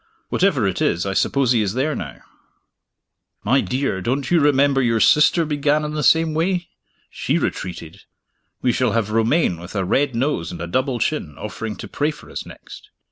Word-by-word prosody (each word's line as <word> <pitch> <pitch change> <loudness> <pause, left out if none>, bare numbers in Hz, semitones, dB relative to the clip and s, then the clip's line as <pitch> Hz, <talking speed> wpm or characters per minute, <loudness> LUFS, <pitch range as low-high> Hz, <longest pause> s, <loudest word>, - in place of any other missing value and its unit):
Whatever 165 - +2
it 95 - -2
is, 85 +2 +1
I 95 - -2
suppose 135 +5 +1
he 120 -3 +3
is 105 0 -2
there 145 +4 0
now." 65 -3 -7 1.2
"My 130 +6 +3
dear, 130 -7 -2
don't 130 - -2
you 175 - +5
remember 140 -2 +3
your 115 -2 +1
sister 155 +7 +4
began 150 0 +1
in 150 - -4
the 150 - -2
same 160 +3 +3
way? 175 +2 -1 0.4
She - - -1
retreated. 90 -1 -4 0.6
We 125 - +3
shall 125 -3 0
have 110 -2 0
Romayne 115 - +1
with 85 +4 -10
a 95 -2 0
red 135 +6 +1
nose 115 - -1
and 85 - -8
a 85 - -4
double 130 - -1
chin, 100 - -2
offering 105 0 -5
to - - -8
pray 145 +1 -1
for 150 - -10
us - - -6
next! - - -13
130 Hz, 190 wpm, -21 LUFS, 100-150 Hz, 1.2 s, you